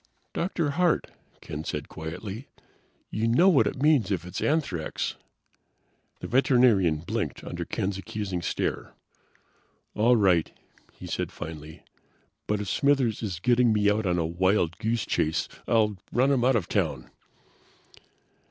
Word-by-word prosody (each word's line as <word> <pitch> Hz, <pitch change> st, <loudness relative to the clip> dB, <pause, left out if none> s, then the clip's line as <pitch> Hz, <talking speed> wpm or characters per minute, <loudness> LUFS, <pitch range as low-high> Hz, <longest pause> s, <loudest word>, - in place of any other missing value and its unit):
"Dr. 170 Hz, -4 st, -1 dB
Hart," 175 Hz, +2 st, +1 dB, 0.3 s
Ken 75 Hz, +1 st, -6 dB
said 75 Hz, -2 st, -4 dB
quietly. 95 Hz, -, -7 dB, 0.6 s
"You 110 Hz, +2 st, 0 dB
know 150 Hz, +12 st, +5 dB
what 160 Hz, -8 st, +4 dB
it 135 Hz, -, -3 dB
means 145 Hz, -10 st, +4 dB
if 90 Hz, -4 st, -2 dB
it 90 Hz, -, -10 dB
is -, -, -3 dB
anthrax." 140 Hz, -, -1 dB, 1.1 s
The -, -, -5 dB
veterinarian 120 Hz, -, +3 dB
blinked 85 Hz, -, -3 dB
under -, -, -5 dB
Ken's 95 Hz, 0 st, -2 dB
accusing 95 Hz, -3 st, -4 dB
stare. -, -, -3 dB, 1.0 s
"All 120 Hz, +3 st, +4 dB
right," 90 Hz, -6 st, +3 dB, 0.4 s
he -, -, -12 dB
said -, -, -3 dB
finally. 80 Hz, 0 st, -9 dB, 0.6 s
"But 105 Hz, 0 st, 0 dB
if 105 Hz, -, -5 dB
Smithers 135 Hz, -2 st, +2 dB
is 95 Hz, -7 st, -4 dB
getting 120 Hz, +2 st, +3 dB
me 105 Hz, -1 st, +3 dB
out 105 Hz, -1 st, 0 dB
on 90 Hz, -1 st, +1 dB
a 85 Hz, -, +1 dB
wild 85 Hz, 0 st, +1 dB
goose 115 Hz, 0 st, -1 dB
chase 80 Hz, +1 st, 0 dB, 0.2 s
I'll 105 Hz, -3 st, +2 dB
run 130 Hz, +3 st, +3 dB
him 130 Hz, -4 st, +2 dB
out 130 Hz, +1 st, +4 dB
of 105 Hz, -7 st, 0 dB
town!" -, -, -1 dB
105 Hz, 145 wpm, -27 LUFS, 90-125 Hz, 1.1 s, know